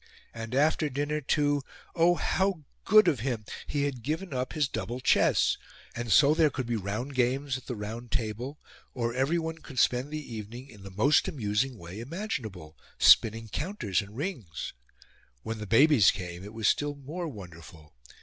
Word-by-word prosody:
And, 115 +1 -5
after 155 +2 +2
dinner, 145 +3 -2
to 145 +1 +1 0.3
oh, 175 +1 +4
how 190 -2 0 0.2
good 215 -1 +7
of 150 -8 +2
him! 115 -2 -2 0.2
He 145 -1 -1
had 140 -4 -2
given 155 +7 -3
up 130 0 -2
his 150 -4 +1
double 115 +1 -4
chess! 130 - +3 0.4
And 120 -1 -3
so 145 +6 +6
there 160 -1 +4
could 130 -2 -4
be 120 0 -1
round 110 +7 -3
games 130 +2 +1
at 130 - -8
the 125 - -3
round 115 +3 -6
table, 125 +3 -2 0.4
or 115 -2 -1
everyone 160 +5 0
could 140 -4 -12
spend 125 +3 +2
the 150 -5 -6
evening 115 +4 -7
in 105 -3 -14
the 100 - -9
most 105 +11 +3
amusing 120 0 -1
way 85 +2 -9
imaginable 115 - -5 0.2
spinning 115 0 +5
counters 110 - -1
and 105 +2 -11
rings.' 130 - -4 0.7
When 110 0 -4
the 105 - -6
babies 125 0 +6
came 90 -1 -4
it 105 +2 -10
was 110 -2 0
still 145 0 +1
more 155 +6 -5
wonderful. 85 - -11
125 Hz, 170 wpm, -29 LUFS, 110-150 Hz, 0.7 s, good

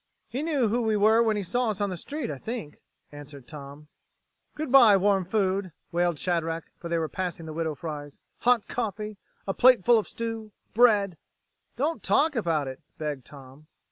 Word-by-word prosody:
"He 260 - -4
knew 295 -7 +1
who 240 +3 +1
we 220 -2 +1
were 220 +3 +5
when 220 -2 +2
he 205 - -2
saw 245 +6 0
us 210 -2 -3
on 205 -1 0
the - - -3
street, 275 - -5
I 140 - -6
think," 220 - -6 0.3
answered 145 -3 -11
Tom. 145 0 -10 0.7
"Good 300 -3 -4
by, 235 -7 +8
warm 195 -1 +2
food," 190 -2 0 0.2
wailed 175 -1 +1
Shadrack, 165 -1 -1 0.2
for 170 - -7
they 170 - +1
were 160 -1 -1
passing 175 -1 -4
the 155 - -7
Widow 160 -1 -2
Fry's. 145 0 -7 0.2
"Hot 245 -3 +3
coffee, 215 -2 -4 0.3
a 195 - -1
plate 250 -5 +5
full 235 -1 +6
of 215 - -5
stew, 225 -2 -5 0.2
bread...." 205 -7 +4 0.6
"Don't 310 +5 -1
talk 310 0 +2
about 165 - 0
it," 130 0 -7 0.2
begged 150 -4 -4
Tom. 140 +1 -14
195 Hz, 185 wpm, -27 LUFS, 155-230 Hz, 0.7 s, by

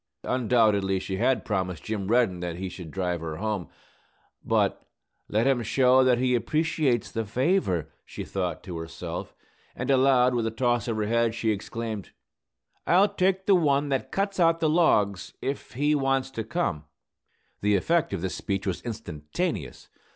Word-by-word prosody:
Undoubtedly, 110 -6 +2
she 95 0 -4
had 125 +5 +1
promised 95 -5 -2
Jim 105 -3 -3
Reddin 110 -5 +2
that 85 -1 -4
he 95 +2 -4
should 90 -2 -9
drive 90 -1 -2
her 80 -1 -4
home. 105 -2 -2 0.8
But - - +1 0.5
"let 110 +3 +1
him 135 -3 +3
show 130 +3 +4
that 125 -1 +4
he 125 +1 +1
appreciates 150 -1 0
the 115 - -2
favor," 110 - 0
she - - -7
thought 90 -4 -3
to 85 -3 -6
herself; 80 0 -6 0.4
and 130 +3 -1
aloud, 130 -1 +4
with 115 -2 0
a - - +1
toss 120 +1 0
of 115 -2 -1
her 105 - 0
head, 115 +1 +1
she 115 -1 0
exclaimed, 110 0 -4 0.8
"I'll 190 +4 +5
take 190 0 +1
the 200 - +5
one 145 -5 +2
that 135 -1 -1
cuts 195 0 -1
out 165 -1 +4
the 160 - +2
logs, 105 - +2
if 135 -4 -4
he 145 +5 +1
wants 135 -2 +1
to 115 -4 -4
come!" 105 - -2 0.8
The 105 0 +3
effect 165 - +1
of 100 -4 -3
this 95 - -2
speech 100 -1 -3
was 95 -3 -2
instantaneous. 90 - -4
115 Hz, 165 wpm, -26 LUFS, 95-135 Hz, 0.8 s, I'll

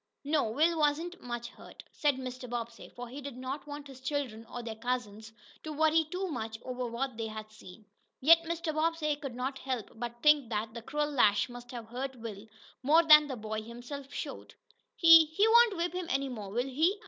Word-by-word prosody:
"No, 295 -1 +1
Will 320 +8 +2
wasn't 310 +4 0
much 240 -1 -5
hurt," - - -13
said 290 -3 +1
Mr. 255 -1 -7
Bobbsey, 235 -1 -5
for 245 0 -8
he 265 +5 -8
did 275 -3 -7
not 265 +3 -5
want 290 0 -7
his 270 -2 -12
children, 260 -5 -3
or 245 - -7
their 230 -1 -5
cousins, 220 -2 -4 0.3
to 310 - -6
worry 315 +1 +3
too 370 +3 -3
much 225 -8 -4
over 250 -1 -3
what 240 +1 -3
they 225 -1 -3
had 215 0 -8
seen. 210 0 -14 0.3
Yet 330 +5 +7
Mr. 335 -1 -2
Bobbsey 310 -1 0
could 275 -4 -7
not 265 +2 -3
help 255 -6 -4
but 240 +1 -7
think 300 -5 +5
that 220 0 -3
the 235 - -7
cruel 295 +5 -2
lash 215 -5 +3
must 245 0 -10
have 235 -3 -8
hurt 265 +3 -4
Will 225 -3 -8 0.3
more 310 +5 +5
than 300 -2 +8
the 265 - -4
boy 215 0 -4
himself 245 +5 -9
showed. - - -7 0.4
"He 330 -1 +9
he 320 +8 +2
won't 460 -3 +6
whip 345 +1 -1
him 360 -1 -4
any 275 0 0
more, 215 -6 -6
will 240 +5 -1
he?" 320 +10 +1
260 Hz, 205 wpm, -31 LUFS, 235-305 Hz, 0.4 s, He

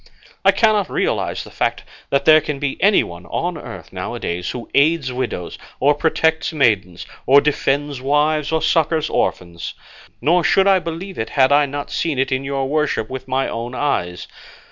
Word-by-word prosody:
I - - +5
cannot 215 -4 +2
realise - - -1
the - - -13
fact - - -1 0.3
that 140 0 +1
there 155 0 +7
can 150 -1 -4
be 135 -1 -3
anyone 90 - +2
on - - -2
earth - - -10
now - - -5
a - - -6
days 85 0 -3
who 120 -2 -6
aids 145 -2 +2
widows, 125 -9 -4 0.2
or 145 +3 +4
protects 160 +2 +1
maidens, 105 - +1 0.2
or 140 +2 +7
defends 145 -1 -1
wives, 150 +2 +1
or 160 0 0
succours 160 -1 +1
orphans; 85 -1 -2 0.4
nor 170 +7 +2
should 190 +3 +3
I 195 -1 +5
believe 170 +3 -6
it 110 - -3
had 130 -1 +3
I 145 0 +4
not 145 +1 -6
seen 160 -5 -1
it 135 - 0
in 130 +1 0
your 135 -1 -2
worship 145 -6 -1
with 130 0 -6
my 130 +1 0
own 120 +2 -5
eyes. 90 -12 -2
140 Hz, 180 wpm, -19 LUFS, 130-155 Hz, 0.4 s, there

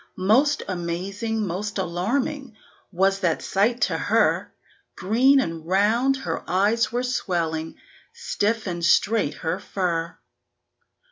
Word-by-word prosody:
Most 265 +11 +3
amazing, 195 +5 -3
most 200 +4 -4
alarming, 230 - -2 0.3
was 195 +2 +1
that 170 -5 0
sight 230 +5 +1
to - - +1
her; - - +1 0.4
Green 250 +8 +3
and 165 -9 -3
round 225 +8 +2
her 265 - -4
eyes 205 +5 +2
were 245 +1 -1
swelling, 165 -10 -2 0.4
stiff 230 - -2
and 175 -3 -4
straight 200 0 +2
her 165 +4 -1
fur. 170 -3 -3
200 Hz, 115 wpm, -24 LUFS, 175-235 Hz, 0.4 s, Most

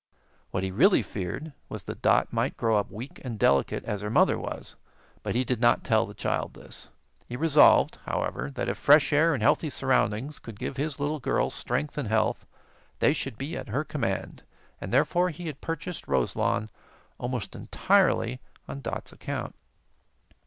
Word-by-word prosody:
What 95 - -2
he 95 - -2
really 180 - +4
feared 105 - -5 0.2
was - - -6
that - - -7
Dot - - +3
might - - 0
grow 115 -1 +2
up 105 - -1
weak 120 +7 -9
and 120 -4 -5
delicate 70 -8 +2
as 105 -1 -3
her 105 - -3
mother 110 - +4
was; - - -6 0.5
but - - -3
he 125 - +2
did 125 -2 -2
not 120 -1 +4
tell - - +2
the - - -11
child - - -2
this. - - -11 0.4
He 120 - -5
resolved, 155 -1 +5
however, 65 - -2
that 70 - -4
if - - -2
fresh 145 0 +5
air 160 +3 +5
and 115 - -3
healthy 155 - +3
surroundings 130 0 0
could 115 -3 -10
give 135 - -4
his 145 0 -2
little 150 +2 -1
girl 135 +1 0
strength 145 +5 -3
and 135 - -2
health, 110 0 0 0.5
they 145 - +3
should 135 -6 -4
be 145 +6 -4
at - - -6
her 135 +8 0
command, 115 - -3 0.4
and - - -5
therefore 180 +1 +3
he 175 +1 -8
had 150 -3 -6
purchased 165 +2 -5
Roselawn 70 - 0 0.5
almost 125 -4 -4
entirely 65 - +2 0.3
on 70 0 -6
Dot's - - -5
account. - - -5
130 Hz, 175 wpm, -27 LUFS, 105-150 Hz, 0.5 s, resolved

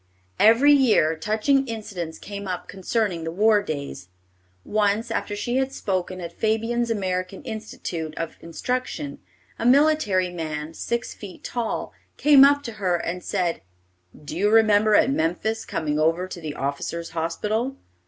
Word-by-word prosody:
Every 235 +7 +6
year 225 - +4
touching 220 - +1
incidents 190 -8 -5
came 200 -1 -7
up 180 -1 -4
concerning 195 -2 -1
the 165 - -3
war 210 +4 +3
days. 140 - -6 0.6
Once, 215 +2 +1
after 205 - -2
she 240 +5 -1
had 265 0 0
spoken 185 -6 -2
at 170 -1 -6
Fabyan's 225 +4 0
American 185 -3 -2
Institute 170 -7 -5
of 165 -1 -4
Instruction, 255 - -3 0.4
a 230 - -2
military 250 -10 +3
man, 155 -2 -5
six 235 +8 -3
feet 200 -3 -11
tall, 235 -3 -3 0.2
came 285 -2 +7
up 285 +1 +5
to 235 - -5
her 180 -2 +2
and 175 +1 -3
said, 180 -4 -1 0.6
"Do 145 - -6
you 200 +4 +2
remember 215 -1 +5
at 260 - +4
Memphis 220 +4 -1
coming 150 -2 -2
over 165 +4 +2
to 180 -2 -8
the 155 -2 -5
officers' 140 +5 -3
hospital?" 210 +10 -2
205 Hz, 145 wpm, -24 LUFS, 170-230 Hz, 0.6 s, came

